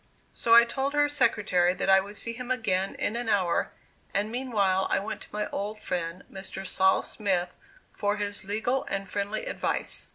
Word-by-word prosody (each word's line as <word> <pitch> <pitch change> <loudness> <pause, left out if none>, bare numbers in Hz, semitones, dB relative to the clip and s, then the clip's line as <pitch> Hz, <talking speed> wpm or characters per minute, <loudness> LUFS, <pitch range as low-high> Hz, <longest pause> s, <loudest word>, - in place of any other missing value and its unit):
So 230 0 +4
I 235 - +10
told 270 +4 -2
her 290 0 +4
secretary 210 -10 +2
that - - -2
I 190 0 +7
would 200 +2 -6
see 230 +2 +1
him 250 +1 -7
again 195 -7 0
in 215 - -1
an 240 -1 -1
hour, 185 -5 +1 0.4
and 205 +2 +1
meanwhile 210 -7 +1
I - - +2
went 205 +3 -4
to - - -11
my 210 0 -2
old 210 +2 -3
friend 170 -1 -3
Mr. 190 0 -6
Sol. 190 +1 +3
Smith 185 -4 -1 0.4
for 205 0 -1
his 205 -1 -2
legal 220 +7 -1
and 195 0 -3
friendly 200 +3 -3
advice. - - -2
205 Hz, 185 wpm, -27 LUFS, 190-230 Hz, 0.4 s, I